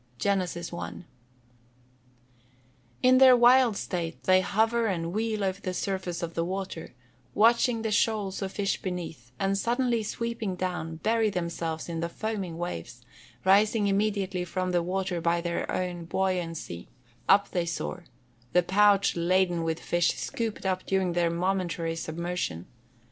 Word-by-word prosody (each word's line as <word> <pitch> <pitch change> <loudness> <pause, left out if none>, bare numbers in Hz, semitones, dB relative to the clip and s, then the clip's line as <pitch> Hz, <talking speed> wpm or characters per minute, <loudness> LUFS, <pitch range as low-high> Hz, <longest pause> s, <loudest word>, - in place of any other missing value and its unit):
GENESIS 180 -1 -1
I.] 175 - -5 2.1
In 255 0 +6
their 260 -2 +8
wild 245 -2 +5
state 170 -4 -4
they 185 0 +5
hover 225 +4 +1
and 170 -3 -2
wheel 215 -1 -1
over 190 +1 -1
the 185 -1 -3
surface 185 -3 -3
of 170 0 -4
the 165 - 0
water, 185 -5 -5 0.4
watching 230 +1 +4
the 220 - -1
shoals 210 -2 0
of 190 -1 -3
fish 200 -1 -1
beneath, 165 - -6
and 195 0 0
suddenly 240 +2 +1
sweeping 230 -2 -3
down, 180 -3 -3
bury 225 0 +2
themselves 170 -3 -3
in 165 -1 -4
the 170 +1 -2
foaming 195 -4 -4
waves; 170 - -6 0.4
rising 205 +3 +4
immediately 195 -2 0
from 185 +1 -2
the 175 -1 +2
water 180 0 -2
by 170 +1 +2
their 170 0 -2
own 175 -2 -3
buoyancy, 170 - -2 0.4
up 200 +1 +5
they 175 -2 -1
soar, 175 +1 -4 0.5
the 180 0 +5
pouch 200 +2 +4
laden 175 0 +2
with 160 -1 -1
the - - -14
fish 175 0 +1
scooped 225 -4 -4
up 185 -1 0
during 190 -2 +1
their 170 -1 +2
momentary 170 -1 -1
submersion. 165 - -3
185 Hz, 145 wpm, -28 LUFS, 170-210 Hz, 2.1 s, their